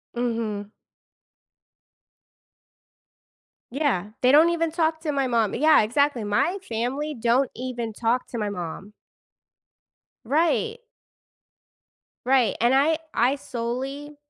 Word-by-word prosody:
Mhm. 225 -4 -3 3.0
Yeah, 250 - -1
they 255 - +5
don't 310 +4 +6
even 330 -1 0
talk 320 0 0
to 315 -2 -2
my 275 -2 0
mom, 230 -4 +1
yeah, 310 +2 +5
exactly, 250 +2 +1
my 210 - 0
family 265 +7 -3
don't 245 +3 +2
even 240 -2 -4
talk 235 +3 -1
to 240 - -6
my 210 -2 -2
mom. 195 +2 -7 1.3
Right. 340 - 0 1.4
Right, 255 -4 +3
and 240 +2 +4
I 305 +4 +3
I 250 +4 +2
solely 270 +3 -5
255 Hz, 105 wpm, -24 LUFS, 230-295 Hz, 3.0 s, don't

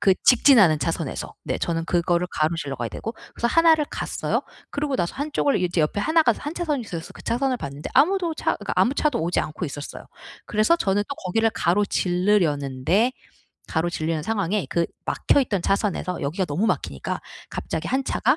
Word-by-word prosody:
그 200 -2 +5
직진하는 225 - +6
차선에서. 125 - -3
네 - - -1
저는 165 -1 -2
그거를 175 0 +1
가로질러 155 -3 -1
가야 120 -2 -3
되고. 225 +1 -5 0.2
그래서 235 - 0
1 330 +4 +6
를 300 -2 -1
갔어요. - - -2 0.3
그러고 285 -2 -1
나서 170 - -1
1 290 +2 -4
쪽을 285 - +2
이제 175 -1 +1
옆에 155 +6 0
1 315 +10 +3
가 235 -7 +3
1 295 - -5
차선이 310 -6 -1
있어서 170 -6 -7
그 - - -12
차선을 255 +2 0
봤는데 140 - -6
아무도 340 +3 +3
차 - - 0
그러니까 - - -4
아무 245 - +4
차도 290 - +1
오지 170 +2 +1
않고 155 +4 -4
있었어요. 145 -1 -7 0.4
그래서 215 +10 +3
저는 205 - +1
또 280 - -3
거기를 225 +5 +1
가로지르려는데 180 - +1 0.6
가로지르려는 160 -1 -1
상황에 205 -1 -1
그 170 - +1 0.2
막혀있던 230 -10 +1
차선에서 195 -2 0
여기가 160 +7 -1
너무 175 +7 -1
막히니까 70 - -2 0.3
갑자기 160 +1 -4
1 265 +1 0
차가 260 +3 +2
195 Hz, 400 characters per minute, -24 LUFS, 165-260 Hz, 0.6 s, 직진하는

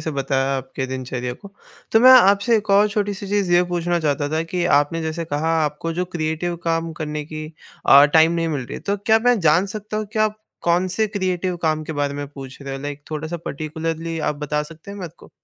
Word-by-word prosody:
से 160 - -3
बताया 135 0 0
आपके 130 0 -5
दिनचर्या 130 -1 -4
को, 200 +10 -12 0.4
तो 225 - +6
मैं 255 +2 +8
आपसे 205 -1 +6
एक 215 -1 -3
और 200 +2 +5
छोटी-सी 205 -1 -2
चीज़ 200 -3 0
ये 175 +1 +6
पूछना 175 0 0
चाहता 145 -2 0
था 160 +1 +1
कि 180 -1 -1
आपने 160 +3 -1
जैसे 160 +1 -3
कहा 160 +2 -1
आपको 150 +3 -3
जो 180 +2 -1
क्रिएटिव 170 0 -3
काम 165 0 -1
करने 150 -1 -4
की 155 0 -7 0.4
अ, 140 +1 +9
टाइम 160 +2 +5
नहीं 165 -1 0
मिल 145 -5 -2
रही - - -7
है, - - -6
तो 200 0 -1
क्या 220 +3 +3
मैं 245 -1 +4
जान 165 +4 +4
सकता 215 0 -6
हूँ 215 -1 -2
कि 220 - -3
आप 215 0 +1 0.2
कौन 175 +2 +2
से 215 +4 0
क्रिएटिव 185 -3 -2
काम 155 -1 +1
के 160 - -5
बारे 145 -1 -1
में 145 0 -4
पूछ 135 -2 -10
रहे 135 0 -5
हो, 135 - -9
लाइक 145 0 -6
थोड़ा-सा 155 +2 -4
पर्टिक्युलर्ली 160 +2 -4
आप 150 - -1
बता 150 0 -1
सकते 165 +5 -12
हैं 205 - -8
मेरे 180 -4 -6
को? - - -16
165 Hz, 230 wpm, -21 LUFS, 145-185 Hz, 0.4 s, अ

